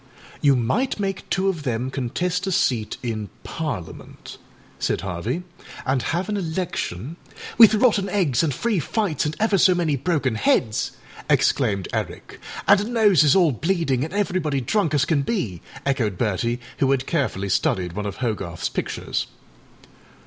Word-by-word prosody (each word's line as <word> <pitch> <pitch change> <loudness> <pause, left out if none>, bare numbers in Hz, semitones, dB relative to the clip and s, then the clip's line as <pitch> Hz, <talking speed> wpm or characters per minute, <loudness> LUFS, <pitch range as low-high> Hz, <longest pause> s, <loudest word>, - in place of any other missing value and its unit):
âYou 140 -3 +5
might 205 - 0
make 195 -2 -3
two 190 0 +1
of 180 -5 0
them 125 -1 -2
contest 175 +9 -2
a - - 0
seat 115 - 0
in 110 -4 -3
Parliament,â 145 - -6 0.4
said - - 0
Harvey, 100 - -3 0.4
âan 130 -1 +1
have 175 +9 -1
an 210 - -1
electionââ 165 - -3 0.4
âWith 220 -2 +8
rotten 210 -5 +3
eggs, 160 - +2
and 160 - +1
free 215 - 0
fights, 165 - -1
and 150 - -3
ever 210 -2 +2
so 185 0 +5
many 165 -4 +1
broken 140 -3 0
heads!â 110 0 +1 0.3
exclaimed 100 -3 +2
Eric. - - -4 0.3
âAnd 200 +1 +5
noses 205 - +5
all 175 -5 +5
bleeding 140 - 0
and 160 - -4
everybody 180 -8 0
drunk 160 - 0
as 145 0 +3
can 150 -3 +1
be,â 130 - -2 0.2
echoed 120 -9 0
Bertie, 115 +3 0 0.2
who 135 - +3
had 135 -1 +1
carefully 130 - -1
studied 90 -2 0
one 105 +2 -3
of 100 - -6
Hogarthâs 105 -8 -3
pictures. - - -2
145 Hz, 150 wpm, -23 LUFS, 120-190 Hz, 0.4 s, âWith